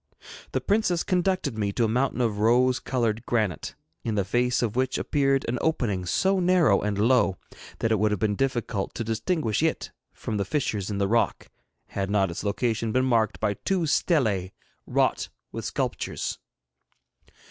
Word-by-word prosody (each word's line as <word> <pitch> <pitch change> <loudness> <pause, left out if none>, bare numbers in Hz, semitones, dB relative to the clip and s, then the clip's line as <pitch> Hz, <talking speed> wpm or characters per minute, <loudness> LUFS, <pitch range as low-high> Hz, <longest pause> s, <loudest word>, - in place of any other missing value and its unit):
The - - 0
princess 200 -5 +1
conducted 180 - 0
me 100 -1 0
to 120 - +1
a - - +3
mountain 125 +3 0
of 110 -4 0
rose 125 +3 +3
coloured 115 -4 -1
granite, 105 -9 -1 0.3
in 110 -2 -2
the 100 -2 +1
face 125 +4 +1
of 115 -2 -1
which 130 0 0
appeared 135 -2 +1
an 120 +1 -1
opening 105 - 0
so 190 - +2
narrow 175 - +4
and 105 -1 -1
low 110 -3 +3 0.4
that 115 - 0
it 110 - +2
would 105 +1 +3
have 105 -2 -1
been 105 -2 +1
difficult 120 -5 -2
to 115 - -2
distinguish 115 - -1
it 160 0 -1 0.2
from 110 - -4
the 100 - +1
fissures 105 -4 -2
in 100 - -2
the 100 0 +1
rock, 115 +3 0 0.4
had 95 -1 -3
not 100 -3 +2
its 85 - -5
location 110 +2 -1
been 130 +3 +2
marked 115 -4 +1
by 105 -2 +1
two 180 - -1
stelae 110 - +1 0.3
wrought - - +1 0.2
with - - -6
sculptures. - - -3
115 Hz, 170 wpm, -26 LUFS, 105-135 Hz, 0.4 s, narrow